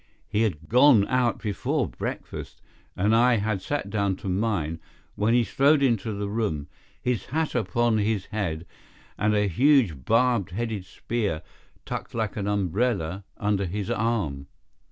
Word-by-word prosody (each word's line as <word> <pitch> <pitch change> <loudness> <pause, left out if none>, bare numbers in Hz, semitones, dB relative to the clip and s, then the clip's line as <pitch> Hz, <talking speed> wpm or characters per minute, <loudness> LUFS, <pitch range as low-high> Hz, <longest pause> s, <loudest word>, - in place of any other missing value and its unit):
He 105 +1 0
had 80 -9 -1
gone 125 -4 +6
out 125 -2 +2
before 105 -5 -1
breakfast, - - -6 0.4
and 105 +4 +2
I 120 +1 +5
had 105 -2 -1
sat 100 -3 -3
down 100 -2 +1
to 95 - -8
mine 90 -5 -1 0.3
when 110 +3 +2
he 120 - +4
strode 140 +5 +3
into 115 -4 +1
the 100 0 -3
room, 100 -9 -1 0.3
his 125 -3 -1
hat 160 +3 -1
upon 115 0 +1
his 105 -2 0
head 85 -6 -2 0.5
and 105 0 +1
a 105 0 +2
huge 110 - +3
barbed 115 - +2
headed 105 0 -3
spear 100 -4 -3 0.4
tucked - - -5
like 110 -3 -1
an 100 -2 -3
umbrella 100 -2 0
under 100 -2 0
his 100 +2 -3
arm. 100 -12 -1
105 Hz, 150 wpm, -26 LUFS, 95-115 Hz, 0.5 s, gone